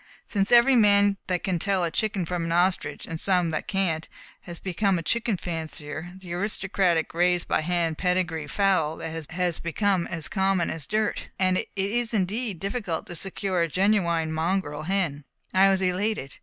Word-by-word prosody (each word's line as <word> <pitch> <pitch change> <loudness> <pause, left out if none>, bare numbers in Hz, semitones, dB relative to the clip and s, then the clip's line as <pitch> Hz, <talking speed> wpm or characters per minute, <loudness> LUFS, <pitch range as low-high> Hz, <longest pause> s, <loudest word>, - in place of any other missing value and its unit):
Since 200 -1 -1
every 240 +2 +7
man 205 -3 +5
that 180 -2 -1
can 185 -4 0
tell 195 0 +1
a 170 - 0
chicken 210 -3 -1
from 175 0 -2
an 165 - -3
ostrich 180 +2 +1
and 160 -1 -6
some 180 -4 +2
that 155 - -3
can't 175 -5 -1 0.3
has 170 -1 -8
become 190 +1 0
a 165 - -4
chicken 225 +4 0
fancier, 160 -1 -5
the 180 -2 -8
aristocratic, 190 -3 0
raised 175 +1 +2
by - - +1
hand, 165 -1 -1
pedigree 180 -4 0
fowl 170 -3 +1
has 165 +2 -3
become 185 +1 0
as 165 -4 -3
common 190 -2 +1
as 160 -2 -6
dirt, 215 0 -1
and 185 -1 +2
it - - -3
is 225 +4 0
indeed 210 +1 -1
difficult 195 -3 -3
to 175 - -7
secure 190 0 -1
a 170 - +2
genuine 170 -3 +1
mongrel 160 -2 -1
hen. 175 -7 0 0.3
I 195 +1 +6
was 190 -1 +2
elated. 185 -6 -1
180 Hz, 170 wpm, -26 LUFS, 165-195 Hz, 0.3 s, every